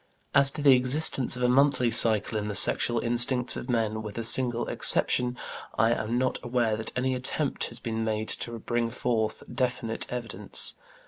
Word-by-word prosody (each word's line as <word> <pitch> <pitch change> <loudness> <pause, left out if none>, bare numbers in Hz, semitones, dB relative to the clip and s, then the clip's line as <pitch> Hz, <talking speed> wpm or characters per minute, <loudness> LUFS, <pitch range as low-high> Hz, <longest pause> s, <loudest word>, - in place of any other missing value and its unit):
As 140 -1 +5
to 150 - -5
the 140 -2 +7
existence 130 0 +1
of 125 - -4
a - - +3
monthly 130 -1 +2
cycle 110 -1 +3
in 105 -1 -2
the 105 - -4
sexual 120 +3 +2
instincts 125 +1 +1
of 125 - -7
men, 110 -2 -1
with 105 -1 -8
a 115 - -3
single 120 +1 +2
exception, 125 0 +1 0.4
I 115 - +3
am 115 0 -2
not 130 0 -1
aware 120 -3 0
that 110 +1 -1
any 130 +1 0
attempt 130 +3 -2
has 115 - -4
been 115 -1 -4
made 110 0 -3
to 115 0 -3
bring 120 +1 -2
forward 115 -2 -2 0.2
definite 125 -3 -2
evidence. 120 -2 -1
120 Hz, 180 wpm, -27 LUFS, 115-125 Hz, 0.4 s, the